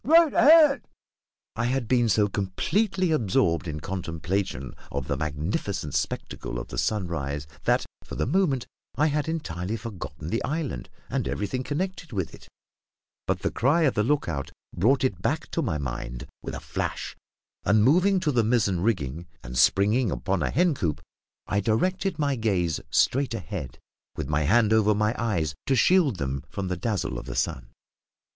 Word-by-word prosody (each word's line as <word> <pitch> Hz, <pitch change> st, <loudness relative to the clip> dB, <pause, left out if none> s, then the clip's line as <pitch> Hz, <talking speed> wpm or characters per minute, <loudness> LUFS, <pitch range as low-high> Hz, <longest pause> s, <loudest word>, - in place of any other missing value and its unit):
right 325 Hz, +1 st, +6 dB
ahead." 300 Hz, -2 st, +7 dB, 0.7 s
I 115 Hz, -, -1 dB
had 125 Hz, -1 st, 0 dB
been 120 Hz, -2 st, +3 dB
so 105 Hz, 0 st, +4 dB
completely 175 Hz, -, 0 dB
absorbed 90 Hz, -, +2 dB
in 75 Hz, -1 st, -4 dB
contemplation 85 Hz, -5 st, -3 dB, 0.2 s
of 65 Hz, -1 st, -3 dB
the 70 Hz, -, 0 dB
magnificent 75 Hz, +2 st, -2 dB
spectacle -, -, -3 dB
of -, -, -6 dB
the -, -, -3 dB
sunrise 75 Hz, -8 st, -2 dB, 0.2 s
that, -, -, +3 dB, 0.2 s
for -, -, -8 dB
the -, -, 0 dB
moment, 140 Hz, -4 st, +1 dB, 0.3 s
I 150 Hz, -, +3 dB
had 150 Hz, 0 st, 0 dB
entirely 100 Hz, -, -3 dB
forgotten 90 Hz, -8 st, -7 dB
the 115 Hz, -, 0 dB
island, 145 Hz, -, -3 dB, 0.2 s
and -, -, -2 dB
everything 105 Hz, +5 st, -2 dB
connected 170 Hz, +4 st, -3 dB
with 95 Hz, -7 st, -3 dB
it; -, -, -13 dB, 0.8 s
but -, -, 0 dB
the -, -, 0 dB
cry 145 Hz, +7 st, +2 dB
of 140 Hz, -, +3 dB
the 105 Hz, -, +1 dB
lookout 105 Hz, -, 0 dB, 0.3 s
brought 125 Hz, +10 st, +3 dB
it 130 Hz, -9 st, 0 dB
back -, -, -1 dB
to -, -, 0 dB
my 75 Hz, -, -1 dB
mind 60 Hz, -3 st, -5 dB, 0.2 s
with -, -, -5 dB
a -, -, -5 dB
flash, -, -, -4 dB, 0.5 s
and, 105 Hz, +1 st, +4 dB
moving 185 Hz, -, +4 dB
to 150 Hz, -, +1 dB
the 120 Hz, -4 st, +3 dB
mizzen 105 Hz, -5 st, +2 dB
rigging, 85 Hz, -, -1 dB, 0.2 s
and 60 Hz, -, -7 dB
springing 105 Hz, -, +4 dB
upon 95 Hz, +1 st, -1 dB
a 70 Hz, -, +1 dB
hen 175 Hz, +2 st, +3 dB
coop, 80 Hz, -, -2 dB, 0.5 s
I 100 Hz, -, 0 dB
directed 180 Hz, -, 0 dB
my 145 Hz, -3 st, +1 dB
gaze 95 Hz, -, 0 dB
straight 135 Hz, -2 st, +2 dB
ahead, 90 Hz, -, -6 dB, 0.4 s
with -, -, -4 dB
my 75 Hz, +1 st, +1 dB
hand 110 Hz, +5 st, +4 dB
over 105 Hz, -1 st, +4 dB
my 105 Hz, +1 st, +1 dB
eyes 85 Hz, -10 st, 0 dB
to 135 Hz, -, +3 dB
shield 165 Hz, -, +4 dB
them 70 Hz, -4 st, -3 dB
from 95 Hz, -2 st, -4 dB
the 90 Hz, -, 0 dB
dazzle 105 Hz, +1 st, -2 dB
of -, -, -10 dB
the -, -, -5 dB
sun. -, -, -1 dB
105 Hz, 170 wpm, -26 LUFS, 80-140 Hz, 0.8 s, ahead